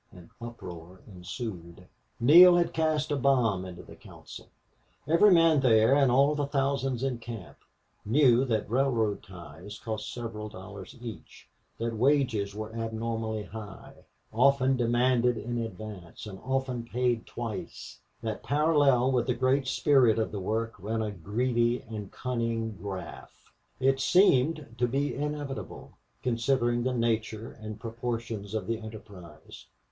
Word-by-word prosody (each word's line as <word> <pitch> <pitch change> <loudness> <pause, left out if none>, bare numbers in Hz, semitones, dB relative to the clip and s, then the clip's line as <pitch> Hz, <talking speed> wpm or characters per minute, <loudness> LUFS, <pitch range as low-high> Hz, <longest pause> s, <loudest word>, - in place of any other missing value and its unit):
An 90 -5 -15
uproar 90 -6 -9
ensued. 90 -2 -8 0.3
Neale 175 +9 +8
had 175 -1 +1
cast 155 -1 0
a - - +2
bomb 120 -9 +2
into 90 -1 -9
the - - -13
council. - - -13 0.6
Every 170 +7 +6
man 165 -3 +5
there 115 -2 +4
and 140 -3 +4
all 140 +4 +4
the 145 -1 -1
thousands 135 -2 -1
in 130 -3 -1
camp 115 -6 -9 0.5
knew 125 +1 +4
that 110 -4 -1
railroad 115 -3 +1
ties 90 +2 -11
cost 110 -1 -5
several 115 -2 -6
dollars 95 -1 -10
each; 115 -2 -10 0.3
that 115 0 -2
wages 115 -5 +1
were 110 +1 -6
abnormally 115 -1 -3
high, 105 -2 -10 0.4
often 135 +2 +4
demanded 120 0 +2
in 120 +2 -3
advance, 105 -5 -7
and 95 -3 -8
often 130 -2 -2
paid 120 -1 -1
twice; 115 -3 -7 0.2
that 110 -2 -3
parallel 145 -4 +3
with 125 -2 +1
the 125 - +1
great 130 +1 +1
spirit 130 -6 +4
of 110 - -1
the 105 - -4
work 110 +4 -2
ran 110 +4 -2
a 105 - -3
greedy 120 +6 0
and 105 -3 -7
cunning 115 -3 -2
graft. 95 -4 -8 0.4
It 135 +1 +2
seemed 150 - +3
to 125 - +3
be 140 +4 -1
inevitable, 145 -1 -5 0.3
considering 120 0 +1
the 130 +2 0
nature 115 -1 -1
and 110 -1 -9
proportions 115 -3 -4
of 105 -4 -2
the 115 +2 -2
enterprise. 100 -8 -12
115 Hz, 140 wpm, -28 LUFS, 110-130 Hz, 0.6 s, Neale